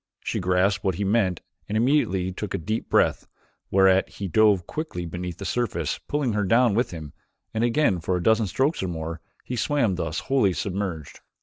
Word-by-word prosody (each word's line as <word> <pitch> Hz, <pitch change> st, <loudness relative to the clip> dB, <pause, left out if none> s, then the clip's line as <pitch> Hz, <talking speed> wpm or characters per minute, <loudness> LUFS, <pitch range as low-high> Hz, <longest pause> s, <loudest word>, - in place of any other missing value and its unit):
She -, -, -2 dB
grasped 95 Hz, +2 st, +1 dB
what 95 Hz, -4 st, 0 dB
he 100 Hz, -, -2 dB
meant 95 Hz, -4 st, +1 dB, 0.3 s
and 105 Hz, -, 0 dB
immediately 110 Hz, -8 st, +2 dB
took 95 Hz, +1 st, -4 dB
a -, -, 0 dB
deep 110 Hz, +7 st, -3 dB
breath, -, -, +2 dB, 0.4 s
whereat 95 Hz, 0 st, +4 dB
he 100 Hz, -, -6 dB
dove 100 Hz, -1 st, +3 dB
quickly 155 Hz, -, -5 dB
beneath 90 Hz, +1 st, -5 dB
the 100 Hz, -, -7 dB
surface 120 Hz, +1 st, -1 dB
pulling 145 Hz, -6 st, 0 dB
her 105 Hz, 0 st, 0 dB
down 115 Hz, +3 st, +4 dB
with 120 Hz, +5 st, +1 dB
him 80 Hz, -4 st, -8 dB, 0.4 s
and 110 Hz, +1 st, 0 dB
again 120 Hz, -, +2 dB
for 90 Hz, +2 st, -1 dB
a 90 Hz, -, -4 dB
dozen 110 Hz, 0 st, +3 dB
strokes 135 Hz, -, 0 dB
or 95 Hz, -, -2 dB
more 80 Hz, -1 st, -5 dB, 0.2 s
he 125 Hz, -, -4 dB
swam 125 Hz, -5 st, +1 dB
thus 80 Hz, -1 st, -2 dB
wholly 130 Hz, -9 st, +2 dB
submerged. 95 Hz, -6 st, -4 dB
100 Hz, 190 wpm, -25 LUFS, 90-115 Hz, 0.4 s, whereat